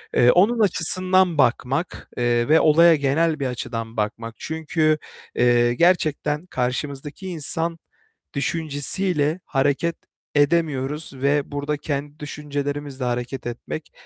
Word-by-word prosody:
eee, 125 0 +6
onun 220 +6 +3
açısından 185 -2 +2
bakmak, 135 +5 0
eee, 120 -1 +1
ve 160 - +6
olaya 165 +2 +6
genel 155 +3 +1
bir 135 - -1
açıdan 115 -2 -5
bakmak. 115 +2 -3
Çünkü, 155 -1 0 0.4
eee, 120 0 +3
gerçekten 155 -1 +1
karşımızdaki 140 +5 -4
insan 165 0 -1 0.6
düşüncesiyle 155 +2 0
hareket 145 +4 0 0.4
edemiyoruz 145 -1 +1
ve 140 +2 0
burada 145 +1 -2
kendi 145 0 -4
düşüncelerimizle 145 -2 -4
hareket 125 +1 -3
etmek 120 +6 -6
145 Hz, 105 wpm, -22 LUFS, 135-165 Hz, 0.6 s, eee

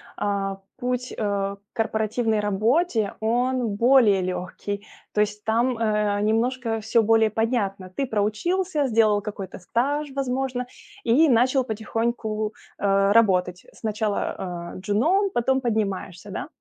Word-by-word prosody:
а, 195 -1 -2 0.2
путь, 250 0 -2
а, 200 -2 -1
к - - -33
корпоративной 220 0 0
работе- 215 - +1
он 240 0 0
более 230 -4 +5
легкий. 185 +3 -4 0.3
То 210 - +2
есть 210 0 -2
там, 235 +3 +1
э, 210 -2 +1
немножко 225 +2 0
всё 220 +2 +2
более 225 0 +4
понятно. 205 -4 -1
Ты 230 +9 -2
проучился, 285 - 0
сделал 215 -3 +3
какой-то 200 -3 -7
стаж, 280 +10 -1
возможно, 260 -1 -1 0.4
и 260 +8 +4
начал 255 +2 +3
потихоньку, 220 -1 -2 0.2
а, 195 0 +2
работать. 185 -5 +3
Сначала, 215 -1 -2
а, 175 -3 -6
джуном, 275 - +1
потом 265 +3 +2
поднимаешься, 205 -5 -2
да. - - -4
220 Hz, 125 wpm, -24 LUFS, 205-245 Hz, 0.4 s, более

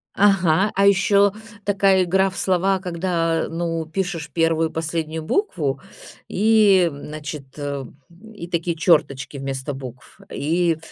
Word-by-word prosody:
Ага. 195 -1 +3
А 195 - +3
еще, 200 0 +4 0.3
такая 195 -2 +3
игра 190 +2 +2
в 190 - -10
слова, 190 +1 +1
когда, 170 -2 -1
ну, 165 -1 -3
пишешь 165 -1 -4
1 165 +1 +1
и - - -17
последнюю 160 0 -3
букву. 155 - -1 0.5
И, 205 -3 +4
м, 140 0 -10
значит, 150 -2 -8
э, 140 -2 -4 0.2
м, 210 +6 -16
и 170 -5 -8
такие 170 -1 -2
черточки 140 -5 +1
вместо 135 +1 -4
букв. 130 -2 -10
И 165 +2 0
170 Hz, 135 wpm, -21 LUFS, 155-190 Hz, 0.5 s, еще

